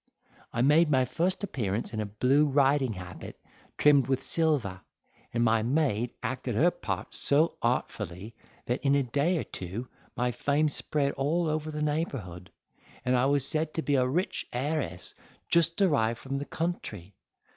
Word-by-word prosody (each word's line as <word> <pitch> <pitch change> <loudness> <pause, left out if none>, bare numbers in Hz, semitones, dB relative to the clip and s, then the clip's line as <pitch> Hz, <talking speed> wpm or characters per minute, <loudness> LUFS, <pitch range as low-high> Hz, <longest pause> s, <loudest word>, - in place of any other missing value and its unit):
I 120 - 0
made 150 +4 +5
my 130 -3 +3
first 175 - -1
appearance 115 - -2
in 110 - -2
a 105 - -2
blue 130 +8 +3
riding 135 -3 +3
habit 90 -1 -9 0.4
trimmed 145 -4 +5
with 135 0 0
silver; 140 - 0 0.5
and 120 0 +1
my 115 -1 +3
maid 120 -2 +1
acted - - -3
her - - +4
part - - -5
so 155 +4 +2
artfully, 105 -4 -2 0.3
that 125 +3 -2
in 140 0 +4
a 140 - +3
day 145 +8 +1
or - - -1
two 95 +7 -6 0.3
my 125 0 +1
fame 145 +5 +1
spread 145 0 -1
all 155 +6 0
over 155 0 -1
the 150 0 -3
neighbourhood, 130 - -3 0.6
and 125 - +3
I 125 +2 +3
was 140 -1 +3
said 155 +1 -1
to 160 - -1
be 145 - 0
a 130 -2 +3
rich 175 +9 -1
heiress 135 - -2 0.4
just 170 +1 +3
arrived 130 - +2
from 135 +2 -4
the 140 - -4
country. 105 - -4
135 Hz, 165 wpm, -28 LUFS, 115-150 Hz, 0.6 s, made